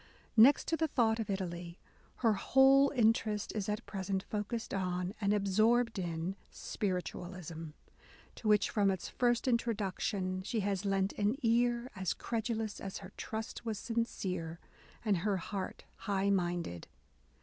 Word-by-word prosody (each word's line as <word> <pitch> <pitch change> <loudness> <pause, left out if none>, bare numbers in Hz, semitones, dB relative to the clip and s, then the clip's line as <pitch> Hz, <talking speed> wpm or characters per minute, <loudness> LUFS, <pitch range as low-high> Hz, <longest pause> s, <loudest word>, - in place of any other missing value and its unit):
Next 235 +6 +7
to 330 - +2
the 320 0 +1
thought 230 -6 +2
of 220 - -3
Italy, 175 -3 -4 0.5
her 225 - +6
whole 270 +5 +5
interest 220 -3 +2
is 210 -1 -2
at 210 0 -2
present 190 -1 -2
focussed 215 +2 -3
on, 180 -1 -1
and 200 -1 +2
absorbed 215 +3 +3
in, 170 +1 -2
Spiritualism: 180 -3 -4 0.7
to 225 - -6
which, 210 -1 +4
from 205 -2 +3
its 190 -2 -2
first 240 0 +1
introduction, 200 -5 0
she 215 +3 -1
has 200 0 -1
lent 195 0 +1
an 205 +4 +2
ear 240 +1 +2
as 190 -2 -1
credulous 225 -2 -2
as 195 -1 -5
her 190 -1 -10
trust 220 +2 -5
was 220 -3 -2
sincere 185 -8 -2 0.5
and 205 -3 +3
her 195 +3 0
heart 190 +1 -5
high 200 0 0
minded." 175 - -1
205 Hz, 140 wpm, -33 LUFS, 185-225 Hz, 0.7 s, Next